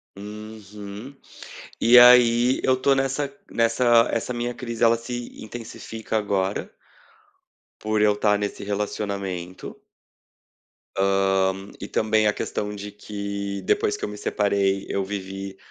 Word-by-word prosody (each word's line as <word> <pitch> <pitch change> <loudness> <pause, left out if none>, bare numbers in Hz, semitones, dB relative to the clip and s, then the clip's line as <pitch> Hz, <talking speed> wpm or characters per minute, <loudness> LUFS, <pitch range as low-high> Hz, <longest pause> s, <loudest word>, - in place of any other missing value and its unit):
Uhum, 105 +3 -9 0.7
e 120 +2 +7
aí, 125 0 +6
eu 130 -1 +3
tô 140 - +4
nessa 135 +1 -1 0.2
nessa 115 0 +4
essa 115 +2 -2
minha 120 +1 -3
crise, 120 -2 -4
ela 115 0 +6
se 120 0 -7
intensifica 110 -1 -6
agora 100 -2 -1 1.1
por 110 0 0
eu 105 0 +5
estar 105 0 +2
nesse 100 -1 -4
relacionamento 100 -3 -4 1.2
hã, 95 -1 +2 0.3
e 100 - -5
também 110 0 +2
a 105 - +2
questão 105 0 -4
de 105 0 -7
que, 100 -1 -5
depois 105 - +1
que - - -3
eu - - -5
me 105 - -8
separei, 100 -2 0
eu 100 - -1
vivi 95 0 -6
105 Hz, 125 wpm, -24 LUFS, 100-115 Hz, 1.2 s, e